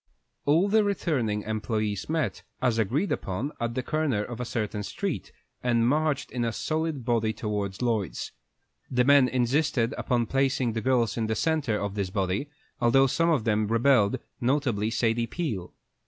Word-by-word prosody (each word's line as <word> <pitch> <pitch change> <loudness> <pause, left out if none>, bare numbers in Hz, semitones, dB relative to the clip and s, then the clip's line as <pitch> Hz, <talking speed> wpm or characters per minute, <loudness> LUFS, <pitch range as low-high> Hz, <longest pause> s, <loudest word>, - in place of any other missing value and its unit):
All 160 +7 +4
the 215 +1 +4
returning 130 - 0
employés 110 -1 -2
met, 160 -1 -1 0.2
as 120 -3 +1
agreed 135 - 0
upon, 100 +10 -2
at 115 0 -2
the 130 - -1
corner 145 -8 0
of 120 +1 -7
a 125 - -2
certain 105 -3 -2
street, - - -4 0.3
and 120 -2 +2
marched 150 +1 +1
in 125 -1 -2
a 115 - 0
solid 155 0 -2
body 115 -3 +1
towards 105 -2 -3
Lloyd's. 110 -8 -1 0.6
The 125 -1 +2
men 140 0 +6
insisted 125 -1 +1
upon 120 -2 +1
placing 135 -1 +1
the 110 - -2
girls 120 -2 +1
in 110 -1 0
the 110 - 0
centre 145 -9 0
of 100 -1 -3
this 100 -2 -2
body, 95 +7 -1 0.3
although 135 +3 +5
some 165 +6 +2
of 150 -9 +2
them 105 -1 +1
rebelled, 115 -1 +3 0.2
notably 120 -5 +1
Sadie 115 0 +1
Peel. 115 - -3
120 Hz, 165 wpm, -27 LUFS, 110-140 Hz, 0.6 s, men